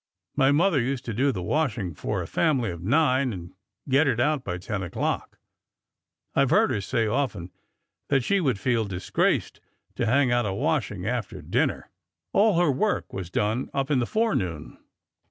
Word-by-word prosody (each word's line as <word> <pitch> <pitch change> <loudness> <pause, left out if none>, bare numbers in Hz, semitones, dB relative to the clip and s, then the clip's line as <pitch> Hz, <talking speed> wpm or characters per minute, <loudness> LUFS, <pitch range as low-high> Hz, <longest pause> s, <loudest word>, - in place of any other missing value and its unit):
My 135 -1 +4
mother 155 -1 +3
used 130 +1 -2
to 115 - -3
do 135 +6 +2
the 95 -7 -4
washing 115 - -1
for - - -3
a - - -8
family 135 - +1
of 85 -1 -8
nine 130 - +2
and 90 -3 -8 0.3
get 140 +3 +3
it 115 - +1
out 150 +1 +1
by 90 -6 -3
ten 100 +2 -4
o'clock. 90 - -3 1.0
I - - +4
've - - 0
heard - - +4
her 100 - -1
say 115 +3 0
often 110 -7 -2 0.6
that 135 -3 +2
she 200 +9 +2
would 130 - 0
feel 115 0 +1
disgraced 95 -2 -1 0.4
to 115 - 0
hang 130 +1 +3
out 120 -2 +2
a 95 - -2
washing - - -1
after - - -3
dinner. - - -1 0.4
All 205 -4 +4
her 175 -5 +4
work 205 +11 -1
was 95 -3 -5
done 110 +7 -1
up 135 +1 -1
in 135 - +3
the 120 - 0
forenoon." 90 - -1
125 Hz, 180 wpm, -26 LUFS, 100-140 Hz, 1.0 s, My